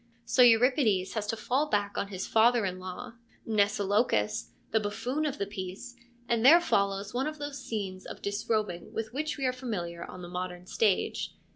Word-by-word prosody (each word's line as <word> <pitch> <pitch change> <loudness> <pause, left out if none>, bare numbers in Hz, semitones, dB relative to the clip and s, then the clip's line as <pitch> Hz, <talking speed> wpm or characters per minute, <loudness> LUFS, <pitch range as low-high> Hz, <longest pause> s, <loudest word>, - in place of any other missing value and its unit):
So 255 - +3
Euripides 230 -5 +4
has 215 -2 -2
to 225 - -2
fall 260 +7 0
back 205 -1 0
on - - -1
his 190 -2 -5
father 230 0 +4
in 185 -1 -3
law, 185 +7 -7 0.3
Mnesilochus, 200 - +1 0.2
the 220 - +3
buffoon 230 +9 -2
of 280 - -3
the 200 - -1
piece, 200 +4 -7 0.3
and 230 -1 +1
there 315 +7 +9
follows 200 - 0
one 260 +4 0
of 310 0 -5
those 290 -2 -6
scenes 195 -5 -4
of - - -8
disrobing 205 -3 -2
with 225 0 -4
which 305 +3 -2
we 275 - -2
are 255 - +2
familiar 180 -10 -4
on 180 - -9
the - - -6
modern 180 0 -5
stage. 200 +1 0
215 Hz, 180 wpm, -29 LUFS, 190-245 Hz, 0.3 s, there